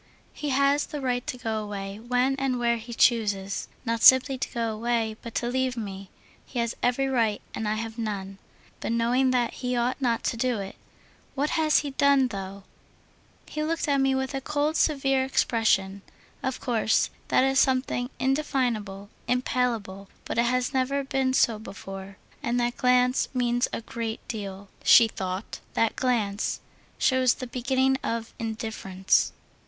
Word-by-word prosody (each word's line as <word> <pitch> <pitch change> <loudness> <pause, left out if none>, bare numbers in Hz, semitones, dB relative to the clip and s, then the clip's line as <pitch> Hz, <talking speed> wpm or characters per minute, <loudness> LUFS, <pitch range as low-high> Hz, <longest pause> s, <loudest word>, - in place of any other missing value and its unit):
"He 295 - -4
has 280 +2 +2
the 295 - -5
right 250 -2 -1
to 250 - -3
go 220 -3 -2
away 200 -1 -6
when 250 +3 +1
and 270 -2 0
where 235 -1 +1
he 230 +1 -9
chooses. 205 -5 +1 0.2
Not 230 -1 -1
simply 260 +1 +7
to 260 - -3
go 230 -2 -1
away, 225 0 -1
but 230 - -9
to 240 - 0
leave 255 0 0
me. 195 -3 -6 0.3
He 255 - -9
has 235 -1 0
every 250 +2 +2
right, 230 -5 +1
and 220 - -3
I 210 - +1
have 225 +1 -5
none. 195 -3 -4 0.4
But - - -2
knowing 245 +3 +2
that, 245 -2 +1
he 250 -1 -1
ought 245 +3 0
not 235 -3 +1
to 230 - -1
do 245 0 0
it. 195 -1 -6 0.6
What 290 +2 0
has 310 -1 +3
he 290 -1 -5
done, 275 -1 +3
though?... 195 -2 -6 0.8
He 305 - -5
looked 320 +1 -1
at 280 -1 +2
me 270 0 +2
with 265 +1 -2
a 270 - -2
cold, 300 +2 0
severe 270 -4 +2
expression. 215 -6 +1 0.4
Of 260 -2 -2
course 225 -3 +1 0.2
that - - +3
is 270 0 +3
something 255 -1 +1
indefinable, 245 -8 -1 0.2
impalpable, 235 -6 -1 0.2
but - - -2
it 235 - +4
has 250 +1 0
never 270 +2 0
been 265 -1 0
so 225 -4 +3
before, 195 -2 -9 0.2
and 240 +1 0
that 240 0 0
glance 250 0 +3
means 245 -1 +1
a - - -3
great 225 0 -5
deal," 200 -3 -6 0.2
she 230 - +8
thought. 190 -1 -5 0.2
"That 225 - +2
glance 215 -6 0 0.4
shows 260 -2 +3
the 255 - -6
beginning 265 +2 +1
of 230 0 -3
indifference." 220 -4 0
240 Hz, 165 wpm, -26 LUFS, 220-260 Hz, 0.8 s, she